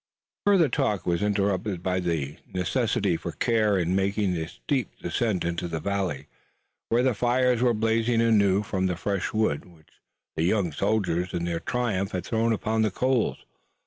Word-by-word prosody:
Further 190 -6 +5
talk 105 -6 0
was 85 -1 0
interrupted 100 -2 0
by 95 -1 0
the 80 -5 -2
necessity 100 -2 0
for - - -6
care 110 -4 +2
in 90 0 0
making 100 0 +1
the 80 -2 -2
steep 130 - -2
descent 95 +2 -1
into 85 0 -2
the 80 -1 -3
valley, 95 -8 -2 0.6
where 120 +2 +3
the 130 -1 +3
fires 125 +2 +2
were 120 -2 +3
blazing 115 +2 +1
anew 105 -4 +3
from 95 -2 -1
the 90 - -1
fresh 100 +2 -2
wood 110 -10 0
which 85 -3 -22 0.3
the - - -1
young 90 -1 +1
soldiers 90 -1 0
in 85 0 -1
their 85 -1 -2
triumph 105 -5 -1
had 90 - -3
thrown 115 0 +1
upon 110 0 0
the 110 - +3
coals. 125 +3 0
100 Hz, 170 wpm, -26 LUFS, 90-115 Hz, 0.6 s, Further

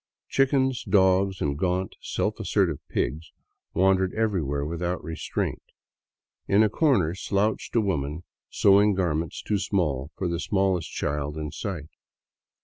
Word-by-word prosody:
Chickens, 135 -2 +2
dogs, 95 -1 +3
and 70 -1 0
gaunt, 90 +4 -1
self - - -2
assertive - - +1
pigs 80 +2 -2 0.4
wandered 95 0 +3
every 110 -5 +1
where 70 0 -2
without 85 +3 -3
restraint. 80 0 -3 0.9
In 100 +2 +5
a 110 - +3
corner 100 - +2
slouched 100 +5 -1
a 115 - +5
woman 80 -5 -2 0.3
sewing 100 +1 +4
gar 90 -4 +1
ments 80 0 -3
too 105 - 0
small 75 -9 -1
for 95 - -1
the 85 -1 -2
smallest 95 -3 0
child 75 +1 -2
in 75 -1 -4
sight. 80 -2 -5
95 Hz, 140 wpm, -26 LUFS, 80-100 Hz, 0.9 s, In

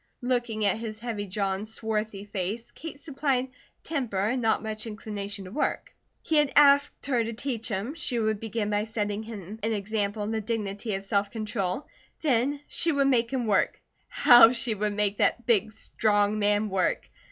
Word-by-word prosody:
Looking 240 -4 0
at 200 +2 +2
his 220 -2 -5
heavy 220 -3 -4
jaw 195 0 -1
and 200 +3 -5
swarthy 215 -2 -3
face, 205 +3 -4
Kate 315 -3 -9
supplied 270 -3 -1 0.3
"temper" 255 -11 -2
and 220 +6 +1
"not 225 0 +1
much 215 +1 -5
inclination 205 -2 -5
to 185 - -9
work." 295 - -2 0.3
He 320 - +1
had 295 -2 +3
asked 285 0 +5
her 250 -4 +1
to 230 +1 -4
teach 235 -1 -3
him, 210 +6 -3
she 300 -6 -2
would 220 -2 0
begin 220 -1 -2
by 205 +1 +1
setting 210 -2 -2
him 215 -2 -8
an 220 +1 0
example 205 0 -2
in 210 - -3
the 220 -1 -1
dignity 210 -1 -3
of 195 - -5
self 200 0 0
control; 205 0 -3 0.4
then 280 0 +1
she 335 - +1
would 280 -2 +2
make 240 -2 +2
him 255 -3 -1
work. 205 -3 +1 0.3
How 240 -2 +8
she 235 -1 0
would 210 0 -1
make 205 -1 0
that 240 - +2
big, 220 -3 +3
strong 210 -1 +1
man 205 +1 +2
work! 190 -1 0
220 Hz, 185 wpm, -27 LUFS, 205-240 Hz, 0.4 s, How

